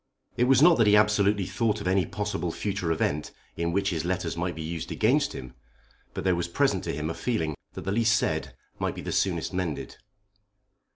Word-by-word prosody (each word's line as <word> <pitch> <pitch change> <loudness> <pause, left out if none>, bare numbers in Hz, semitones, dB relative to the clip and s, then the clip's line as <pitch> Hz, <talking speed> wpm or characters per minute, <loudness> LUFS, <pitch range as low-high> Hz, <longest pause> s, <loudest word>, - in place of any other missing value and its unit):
It 125 - +2
was 135 +2 +5
not 170 -6 +6
that 115 - +5
he 105 - +6
absolutely 105 -1 +3
thought 110 +2 0
of 105 - -4
any 95 -2 +2
possible 105 -5 -3
future 95 -2 -2
event 75 -2 -1 0.3
in 85 +1 -1
which 100 +2 +1
his 80 -2 -2
letters 90 -1 -2
might 85 +1 -2
be 80 - -5
used 80 0 -5
against 140 +6 +2
him, 65 -1 -8 0.6
but - - -3
there 95 - +3
was 85 0 -1
present 85 - +1
to - - -2
him 75 +1 -3
a 80 - -2
feeling 95 -11 -1 0.2
that - - -6
the 95 - -3
least 110 +1 +3
said 125 0 -2 0.2
might - - -1
be - - -6
the - - -5
soonest - - 0
mended. 90 -5 -3
95 Hz, 210 wpm, -27 LUFS, 85-105 Hz, 0.6 s, not